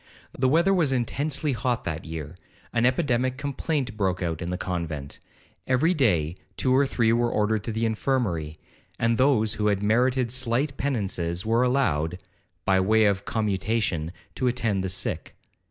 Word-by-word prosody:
The 130 Hz, 0 st, +2 dB
weather 170 Hz, +7 st, +4 dB
was 165 Hz, -7 st, +2 dB
intensely 140 Hz, +4 st, -1 dB
hot 125 Hz, 0 st, -1 dB
that 80 Hz, -1 st, -4 dB
year—an 80 Hz, -, -3 dB
epidemic 130 Hz, -2 st, +1 dB
complaint 140 Hz, -3 st, -2 dB
broke 95 Hz, -4 st, 0 dB
out 80 Hz, -2 st, -2 dB
in 85 Hz, -, -3 dB
the 90 Hz, -, -2 dB
convent—every 90 Hz, -, -3 dB
day 90 Hz, -, +1 dB, 0.2 s
two 130 Hz, -1 st, +2 dB
or 140 Hz, +1 st, +4 dB
three 115 Hz, -4 st, +2 dB
were 120 Hz, 0 st, +2 dB
ordered 105 Hz, -1 st, 0 dB
to 115 Hz, -, -2 dB
the 110 Hz, +1 st, -1 dB
infirmary, 105 Hz, -, -1 dB, 0.4 s
and 115 Hz, +1 st, +1 dB
those 125 Hz, -6 st, +3 dB
who 105 Hz, -, 0 dB
had 100 Hz, -1 st, +1 dB
merited 125 Hz, +3 st, +2 dB
slight 130 Hz, +3 st, 0 dB
penances 95 Hz, -11 st, -2 dB
were 115 Hz, +2 st, +2 dB
allowed, 90 Hz, -, +1 dB, 0.5 s
by 95 Hz, -1 st, +4 dB
way 110 Hz, +3 st, +4 dB
of 100 Hz, -1 st, +1 dB
commutation, 105 Hz, -5 st, -1 dB, 0.2 s
to 130 Hz, -, -1 dB
attend 115 Hz, -6 st, 0 dB
the 95 Hz, -, -2 dB
sick. 95 Hz, +1 st, -3 dB
115 Hz, 155 wpm, -26 LUFS, 95-130 Hz, 0.5 s, weather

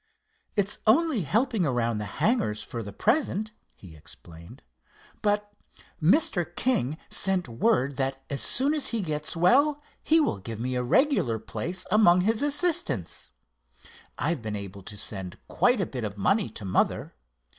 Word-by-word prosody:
"It's 205 Hz, -1 st, 0 dB
only 275 Hz, 0 st, +3 dB
helping 220 Hz, -, 0 dB
around 120 Hz, -6 st, 0 dB
the 105 Hz, -, -4 dB
hangars 210 Hz, -, 0 dB
for 115 Hz, -, -6 dB
the 100 Hz, -2 st, -7 dB
present," 215 Hz, -, 0 dB, 0.2 s
he 85 Hz, -5 st, -14 dB
explained; 80 Hz, +2 st, -14 dB, 0.6 s
"but 205 Hz, 0 st, -1 dB, 0.5 s
Mr. 195 Hz, -, +3 dB
King 155 Hz, -, 0 dB
sent 190 Hz, -1 st, +1 dB
word 130 Hz, -, 0 dB
that 135 Hz, -1 st, -1 dB
as 140 Hz, -, -1 dB
soon 275 Hz, +4 st, +3 dB
as 300 Hz, -3 st, +2 dB
he 230 Hz, -2 st, 0 dB
gets 150 Hz, -2 st, -2 dB
well 280 Hz, -, +3 dB, 0.2 s
he 320 Hz, +1 st, +4 dB
will 295 Hz, -, 0 dB
give 110 Hz, +3 st, -7 dB
me 130 Hz, +2 st, -3 dB
a 125 Hz, -, -1 dB
regular 125 Hz, -, +2 dB
place 175 Hz, +11 st, -3 dB
among 185 Hz, -4 st, +5 dB
his 220 Hz, +4 st, +1 dB
assistants. 290 Hz, -, +1 dB, 0.9 s
I've 155 Hz, -3 st, -1 dB
been 110 Hz, -1 st, -4 dB
able 100 Hz, -1 st, -7 dB
to 105 Hz, +2 st, -9 dB
send 95 Hz, -4 st, -5 dB
quite 245 Hz, -1 st, +2 dB
a 190 Hz, -, 0 dB
bit 125 Hz, -6 st, -6 dB
of 105 Hz, -1 st, -5 dB
money 195 Hz, -, +1 dB
to 105 Hz, -, -8 dB
mother. 95 Hz, -, 0 dB
170 Hz, 155 wpm, -26 LUFS, -, 0.9 s, among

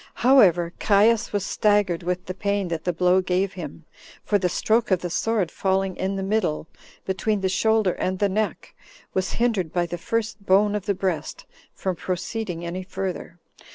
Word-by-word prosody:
However, 180 Hz, -10 st, +5 dB
Caius 220 Hz, +3 st, +3 dB
was 205 Hz, -2 st, -1 dB
staggered 205 Hz, -6 st, +2 dB
with 180 Hz, +1 st, -3 dB
the 185 Hz, -, -4 dB
pain 200 Hz, -1 st, -1 dB
that 165 Hz, -1 st, -4 dB
the 180 Hz, -, +2 dB
blow 180 Hz, +2 st, +3 dB
gave 185 Hz, +1 st, 0 dB
him; 165 Hz, -3 st, -8 dB, 0.4 s
for 205 Hz, -, +2 dB
the 180 Hz, -1 st, +1 dB
stroke 225 Hz, +6 st, +1 dB
of 185 Hz, -3 st, +2 dB
the 175 Hz, -, -4 dB
sword 215 Hz, -3 st, 0 dB
falling 190 Hz, -1 st, 0 dB
in 190 Hz, +1 st, -2 dB
the 195 Hz, -, -3 dB
middle, 190 Hz, -6 st, -1 dB, 0.4 s
between 200 Hz, +2 st, -1 dB
the 190 Hz, -, +1 dB
shoulder 220 Hz, 0 st, +2 dB
and 185 Hz, +1 st, -2 dB
the 205 Hz, -, +2 dB
neck, 210 Hz, +2 st, -2 dB, 0.4 s
was 190 Hz, 0 st, -1 dB
hindered 220 Hz, -9 st, 0 dB
by 175 Hz, -1 st, +1 dB
the 175 Hz, 0 st, -6 dB
first 220 Hz, +1 st, -2 dB
bone 200 Hz, +2 st, +4 dB
of 210 Hz, -1 st, -3 dB
the 200 Hz, -, +1 dB
breast 180 Hz, -5 st, -3 dB, 0.3 s
from 190 Hz, -2 st, -2 dB
proceeding 180 Hz, 0 st, -4 dB
any 175 Hz, +2 st, -4 dB
further. 185 Hz, -2 st, -5 dB
190 Hz, 180 wpm, -24 LUFS, 180-210 Hz, 0.4 s, However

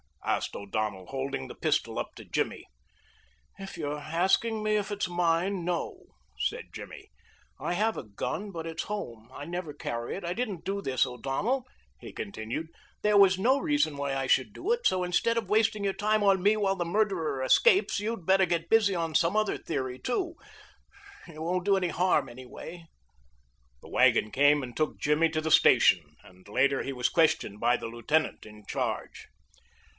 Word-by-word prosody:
asked -, -, -1 dB
O'Donnell, 100 Hz, -2 st, -3 dB
holding 135 Hz, -, -4 dB
the -, -, -8 dB
pistol -, -, -1 dB
up -, -, -5 dB
to -, -, -11 dB
Jimmy. -, -, -2 dB, 0.9 s
"If 195 Hz, -2 st, -8 dB
you're 150 Hz, -2 st, -3 dB
asking 190 Hz, +8 st, +1 dB
me 215 Hz, 0 st, +1 dB
if 205 Hz, 0 st, -2 dB
it's 205 Hz, -2 st, -2 dB
mine, 175 Hz, +2 st, 0 dB
no," 175 Hz, -1 st, -3 dB, 0.3 s
said -, -, -2 dB
Jimmy. -, -, -10 dB, 0.5 s
"I -, -, -2 dB
have 215 Hz, +4 st, 0 dB
a -, -, -4 dB
gun, 155 Hz, -, -4 dB
but 165 Hz, -4 st, -6 dB
it's 165 Hz, -1 st, -4 dB
home. 120 Hz, -, -6 dB
I 145 Hz, -, -7 dB
never 170 Hz, -2 st, -5 dB
carry 120 Hz, -3 st, -4 dB
it. 195 Hz, -, -7 dB
I 170 Hz, +1 st, -2 dB
didn't 210 Hz, -6 st, -3 dB
do 200 Hz, +1 st, -2 dB
this, 130 Hz, -7 st, +1 dB
O'Donnell," 135 Hz, -, -2 dB, 0.3 s
he -, -, -10 dB
continued. 160 Hz, -, -5 dB, 0.3 s
"There 210 Hz, -1 st, +4 dB
was 190 Hz, -2 st, +6 dB
no 255 Hz, +8 st, +3 dB
reason 290 Hz, -, +1 dB
why 140 Hz, -1 st, -2 dB
I 135 Hz, 0 st, -1 dB
should 130 Hz, -4 st, +2 dB
do 415 Hz, -, -3 dB
it, 480 Hz, +1 st, +2 dB
so 185 Hz, -1 st, +1 dB
instead 180 Hz, +6 st, +1 dB
of 220 Hz, -5 st, -2 dB
wasting 215 Hz, 0 st, +2 dB
your 195 Hz, -1 st, +1 dB
time 215 Hz, +1 st, +1 dB
on 195 Hz, -2 st, +4 dB
me 205 Hz, +3 st, +4 dB
while 195 Hz, -2 st, +1 dB
the 175 Hz, -, -1 dB
murderer 170 Hz, -8 st, 0 dB
escapes 385 Hz, -, +4 dB
you'd 215 Hz, -3 st, -4 dB
better 190 Hz, +1 st, +4 dB
get 170 Hz, -1 st, -1 dB
busy 215 Hz, -4 st, +4 dB
on 165 Hz, -2 st, -2 dB
some 170 Hz, +5 st, +2 dB
other 215 Hz, -1 st, +1 dB
theory, 130 Hz, -5 st, -4 dB
too. 340 Hz, +6 st, -2 dB, 0.9 s
It 160 Hz, -3 st, -11 dB
won't 180 Hz, +2 st, -1 dB
do 200 Hz, -1 st, +4 dB
any 180 Hz, -2 st, 0 dB
harm, 180 Hz, +2 st, +2 dB
anyway." 130 Hz, +7 st, -10 dB, 1.0 s
The -, -, -12 dB
wagon 110 Hz, -, +3 dB
came 145 Hz, +1 st, +4 dB
and 120 Hz, -2 st, -8 dB
took 155 Hz, -1 st, -1 dB
Jimmy 150 Hz, +3 st, +2 dB
to 155 Hz, 0 st, -2 dB
the 160 Hz, 0 st, -2 dB
station, -, -, +5 dB
and 90 Hz, +1 st, -18 dB
later 135 Hz, +6 st, +2 dB
he 135 Hz, -, -4 dB
was 125 Hz, -2 st, 0 dB
questioned 155 Hz, -, +1 dB
by 120 Hz, +2 st, +3 dB
the -, -, -6 dB
lieutenant 120 Hz, +7 st, -1 dB
in 105 Hz, -1 st, -14 dB
charge. -, -, -4 dB
170 Hz, 180 wpm, -28 LUFS, 135-205 Hz, 1.0 s, was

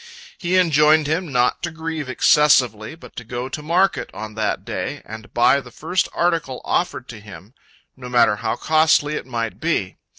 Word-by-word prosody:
He 180 Hz, +1 st, +1 dB
enjoined 155 Hz, -3 st, +4 dB
him 160 Hz, +2 st, -2 dB
not 125 Hz, -1 st, +1 dB
to 170 Hz, -, -2 dB
grieve 160 Hz, -3 st, -5 dB
excessively, 130 Hz, -4 st, +3 dB
but 165 Hz, -, -15 dB
to 120 Hz, -, -6 dB
go 120 Hz, +3 st, -5 dB
to 150 Hz, -, -5 dB
market 175 Hz, +5 st, +1 dB
on 110 Hz, 0 st, -7 dB
that 110 Hz, -1 st, -2 dB
day, -, -, -5 dB
and 110 Hz, 0 st, -10 dB
buy 120 Hz, +4 st, +3 dB
the 125 Hz, -, -13 dB
first 160 Hz, +9 st, -2 dB
article 165 Hz, -7 st, -1 dB
offered 150 Hz, -7 st, -1 dB
to 115 Hz, -, -9 dB
him, 105 Hz, +1 st, -13 dB, 0.4 s
no 125 Hz, -1 st, -9 dB
matter 120 Hz, -4 st, +3 dB
how 105 Hz, -, -2 dB
costly 155 Hz, +1 st, +2 dB
it -, -, -6 dB
might 115 Hz, -3 st, -4 dB
be. 155 Hz, -, -1 dB
135 Hz, 175 wpm, -21 LUFS, 120-160 Hz, 0.4 s, enjoined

